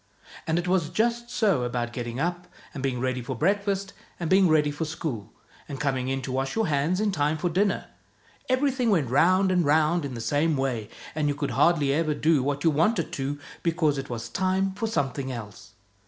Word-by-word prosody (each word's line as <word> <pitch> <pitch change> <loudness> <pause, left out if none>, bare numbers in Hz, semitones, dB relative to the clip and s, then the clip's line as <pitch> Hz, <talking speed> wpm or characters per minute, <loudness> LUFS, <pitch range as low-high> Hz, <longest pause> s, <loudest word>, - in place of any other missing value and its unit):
And 160 +1 +1
it 175 +1 -1
was 180 -3 +1
just 235 +1 0
so 200 - +2
about 120 -1 -2
getting 120 0 -4
up, 175 +3 -2 0.3
and 135 - -5
being 130 -2 -1
ready 130 0 -1
for 120 - -5
breakfast, 195 +2 0 0.3
and 170 -1 -3
being 190 0 +6
ready 150 -2 +3
for 145 +3 -3
school, 150 -8 -4 0.4
and 140 - -5
coming 130 -3 -1
in 135 0 -2
to 130 - -4
wash 135 +1 -2
your 225 -1 +2
hands 155 +4 +1
in 215 -1 +1
time 150 -2 0
for 175 +3 -1
dinner: 195 +4 +1 0.6
everything 255 -2 +2
went 155 - +2
round 185 +7 +4
and 180 -1 +3
round 155 +3 +3
in 135 -3 -5
the - - -5
same 145 +6 +1
way, 125 -6 -2 0.2
and 150 -1 0
you 145 - 0
could 145 -1 -2
hardly 150 -5 +3
ever 155 0 +1
do 155 -1 +3
what 140 +2 -2
you 165 - +4
wanted 170 +4 +1
to, 140 +1 -3 0.2
because 160 -4 +1
it 135 - -6
was 115 -1 -4
time 190 +5 0
for 210 +3 -2
something 140 - -2
else. 105 -4 -9
150 Hz, 205 wpm, -26 LUFS, 135-185 Hz, 0.6 s, being